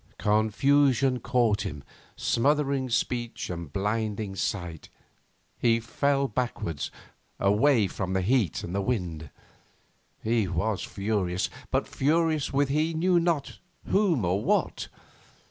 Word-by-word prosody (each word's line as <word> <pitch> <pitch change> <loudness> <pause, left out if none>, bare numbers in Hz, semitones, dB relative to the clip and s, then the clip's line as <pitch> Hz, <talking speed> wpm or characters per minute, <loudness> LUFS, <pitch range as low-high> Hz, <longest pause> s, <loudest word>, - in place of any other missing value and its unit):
Confusion 130 +5 +3
caught 115 -4 +1
him, 75 -2 -6 0.3
smothering 140 0 +1
speech 120 -3 -2
and 85 -4 -6
blinding 105 +1 -2
sight. 90 -4 -3 0.7
He 115 -1 +3
fell 140 +4 0
backwards, 100 - -3 0.5
away 110 +4 +4
from 95 0 -3
the 95 -1 +1
heat 115 - +1
and 85 - -5
wind. 85 - -2 0.9
He 110 -2 +1
was 95 +4 -1
furious, 100 -3 -1 0.2
but - - 0
furious 155 +1 +1
with 140 0 +1
he 155 +3 +1
knew 175 +2 +3
not 165 -4 -1 0.3
whom 180 - +3
or 95 +4 0
what. - - 0
115 Hz, 110 wpm, -27 LUFS, 95-140 Hz, 0.9 s, away